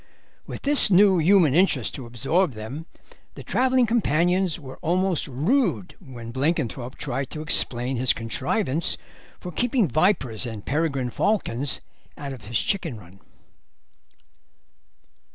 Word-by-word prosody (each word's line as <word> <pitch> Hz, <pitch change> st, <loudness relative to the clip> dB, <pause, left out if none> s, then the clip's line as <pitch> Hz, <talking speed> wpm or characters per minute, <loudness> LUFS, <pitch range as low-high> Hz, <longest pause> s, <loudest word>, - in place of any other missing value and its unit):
With -, -, -8 dB
this 285 Hz, -5 st, +5 dB
new 190 Hz, -1 st, +5 dB
human 170 Hz, -3 st, +4 dB
interest 155 Hz, -, +2 dB
to 130 Hz, -4 st, -7 dB
absorb 140 Hz, +7 st, 0 dB
them 130 Hz, +10 st, -8 dB, 0.5 s
the -, -, -9 dB
travelling 255 Hz, -1 st, +2 dB
companions 180 Hz, -5 st, +1 dB
were 130 Hz, -3 st, -11 dB
almost 180 Hz, 0 st, 0 dB
rude 150 Hz, -, 0 dB
when 120 Hz, -3 st, -10 dB
Blenkinthrope 135 Hz, -3 st, -2 dB
tried 135 Hz, 0 st, -4 dB
to 155 Hz, -, -7 dB
explain 125 Hz, -4 st, +3 dB
his 125 Hz, +1 st, +3 dB
contrivance 135 Hz, -, -1 dB, 0.4 s
for 180 Hz, -, -8 dB
keeping 240 Hz, -, 0 dB
vipers 130 Hz, -, 0 dB
and 110 Hz, -3 st, -8 dB
peregrine 140 Hz, -4 st, -1 dB
falcons 145 Hz, -, -1 dB, 0.4 s
out 140 Hz, -2 st, -6 dB
of 125 Hz, -5 st, -12 dB
his 115 Hz, +2 st, -1 dB
chicken 175 Hz, -, -2 dB
run. 95 Hz, +1 st, -17 dB
150 Hz, 125 wpm, -24 LUFS, 125-185 Hz, 0.5 s, this